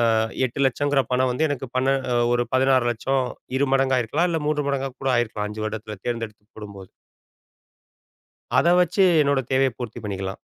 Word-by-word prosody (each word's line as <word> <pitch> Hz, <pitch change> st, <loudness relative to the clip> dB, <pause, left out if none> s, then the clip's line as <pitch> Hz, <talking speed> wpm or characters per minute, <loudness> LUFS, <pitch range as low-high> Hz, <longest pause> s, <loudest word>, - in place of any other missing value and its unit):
அ -, -, +2 dB, 0.3 s
8 140 Hz, +4 st, -5 dB
லட்சங்கற 145 Hz, +2 st, +1 dB
பணம் 125 Hz, 0 st, +2 dB
வந்து 155 Hz, +5 st, +1 dB
எனக்கு 135 Hz, -2 st, -3 dB
பன்ன 135 Hz, +1 st, +2 dB, 0.4 s
ஒரு 120 Hz, 0 st, +1 dB
16 130 Hz, -2 st, +3 dB
லட்சம் 130 Hz, +3 st, -1 dB, 0.3 s
2 140 Hz, 0 st, +1 dB
மடங்காகிருக்கலாம், 135 Hz, +5 st, +1 dB
இல்ல 165 Hz, -, 0 dB
3 150 Hz, -2 st, 0 dB
மடங்கா 135 Hz, -1 st, -1 dB
கூட 135 Hz, -, 0 dB
ஆயிருக்கலாம், 110 Hz, -3 st, -1 dB
5 110 Hz, 0 st, -5 dB
வருடத்தில 110 Hz, -1 st, -5 dB
தேர்ந்தெடுத்து 115 Hz, -3 st, -4 dB
போடும்போது. 100 Hz, -3 st, -10 dB, 1.7 s
அத -, -, +3 dB
வச்சு 180 Hz, +3 st, +3 dB, 0.2 s
என்னோட 140 Hz, -1 st, +2 dB
தேவைய 130 Hz, 0 st, +3 dB
பூர்த்தி 120 Hz, -1 st, -6 dB
பண்ணிக்கலாம். 95 Hz, -2 st, -4 dB
130 Hz, 155 wpm, -23 LUFS, 110-135 Hz, 1.7 s, 16